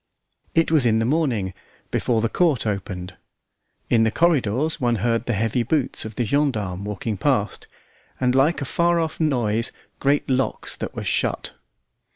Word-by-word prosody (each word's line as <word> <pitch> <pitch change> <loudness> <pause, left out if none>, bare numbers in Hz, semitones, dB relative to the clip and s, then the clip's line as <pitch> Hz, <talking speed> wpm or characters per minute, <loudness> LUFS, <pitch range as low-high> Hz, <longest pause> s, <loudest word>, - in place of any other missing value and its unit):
It 165 -1 +3
was 155 -5 +4
in 110 -2 +3
the 115 - +1
morning, 120 - 0 0.4
before 115 -3 +1
the 115 - +2
court 150 -2 +1
opened. 95 -3 -4 0.7
In 115 - +3
the 110 - +4
corridors 150 0 +1
one 120 -1 +2
heard 115 +2 0
the 120 - +1
heavy 115 +3 0
boots 130 0 0
of 110 -1 -7
the 120 - 0
gendarmes 105 -9 0
walking 105 +1 -3
past, - - 0 0.5
and 125 -1 +2
like 145 +3 +3
a - - -4
far 170 +4 +2
off 160 -1 -2
noise 120 -7 +1 0.3
great 140 +1 +1
locks 130 0 -1
that - - -5
were - - -4
shut. - - -1
120 Hz, 165 wpm, -23 LUFS, 110-145 Hz, 0.7 s, was